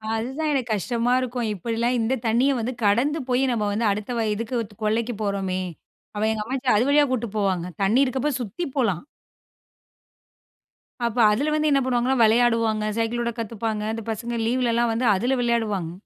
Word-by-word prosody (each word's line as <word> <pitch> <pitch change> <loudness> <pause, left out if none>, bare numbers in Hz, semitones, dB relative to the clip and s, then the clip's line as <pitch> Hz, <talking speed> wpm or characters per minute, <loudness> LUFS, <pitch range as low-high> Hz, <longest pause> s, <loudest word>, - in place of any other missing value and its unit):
அதுதான் 265 +8 -2
எனக்கு 250 -4 -1
கஷ்டமா 235 +4 0
இருக்கும். 245 -2 -2
இப்படிலாம் 230 +5 -1
இந்த 225 +3 +1
தண்ணீய 240 +5 +3
வந்து 235 +3 -2
கடந்து 245 +10 +2
போயி, 250 +1 +2
நம்ம 225 -3 0
வந்து 220 +3 0
அடுத்த 210 +4 -4
வயலுக்கு 225 +2 -1
இது 205 -1 -14
கொல்லைக்கு 225 +3 0
போறோமே, 195 -2 -1 0.5
அவ 210 +1 0
எங்க 215 -1 -2
அம்மாச்சி 260 +2 -2
அது 220 +4 +3
வழியா 290 +1 +5
கூட்ட்டு 240 -3 -1
போவாங்க. 190 -4 0 0.2
தண்ணீ 220 +7 +3
இருக்கப்போ 265 +3 -1
சுத்தி 235 - -5
போலாம். 210 - +1 2.0
அப்போ 235 +1 -1
அதுல 280 +9 0
வந்து 305 0 +2
என்ன 275 - +4
பண்ணுவாங்கன்னா, 255 +1 +1
வெளையாடுவாங்க, 225 -1 +3
சைக்கிளோட்ட 235 +1 -1
கத்துப்பாங்க. 220 -1 -3
அந்த 225 0 -5
பசங்க 235 +2 -4
லீவ் 250 +3 +1
ல - - +2
எல்லாம் 235 0 +2
வந்து 235 +3 -1
அதுல 245 +7 +1
விளையாடுவாங்க. 220 -8 0
230 Hz, 165 wpm, -24 LUFS, 215-250 Hz, 2.0 s, வழியா